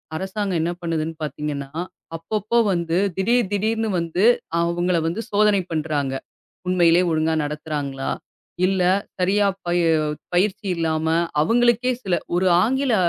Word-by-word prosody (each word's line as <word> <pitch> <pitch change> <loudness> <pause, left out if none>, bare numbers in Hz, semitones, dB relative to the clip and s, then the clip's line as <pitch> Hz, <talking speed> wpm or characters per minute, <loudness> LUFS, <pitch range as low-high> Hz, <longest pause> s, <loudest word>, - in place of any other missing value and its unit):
அரசாங்கம் 190 0 -2
என்ன 170 - 0
பண்ணுதுன்னு 165 -1 -2
பாத்தீங்கன்னா, 150 -2 -4 0.5
அப்பப்ப 210 +5 -4 0.2
வந்து 170 -1 0 0.2
திடீர் 230 +1 +2
திடீர்னு 220 +2 0
வந்து 170 +4 0 0.4
அவுங்களை 170 0 +1
வந்து 175 +7 -2
சோதனை 205 -1 +3
பண்றாங்க. 150 -4 -1 0.5
உண்மையிலே 175 -1 +4
ஒழுங்கா 160 0 +1
நடத்துறாங்களா 145 -2 -4 0.6
இல்ல 190 -1 +1 0.4
சரியா 200 +3 +3 0.2
ப - - -2 0.6
பயிற்சி 200 +4 +1
இல்லாம 160 -1 -1 0.3
அவுங்களுக்கே 240 +6 +3
சில 185 -3 +1 0.2
ஒரு 180 +2 +2 0.2
ஆங்கில 265 +1 +1
175 Hz, 115 wpm, -22 LUFS, 160-205 Hz, 0.6 s, உண்மையிலே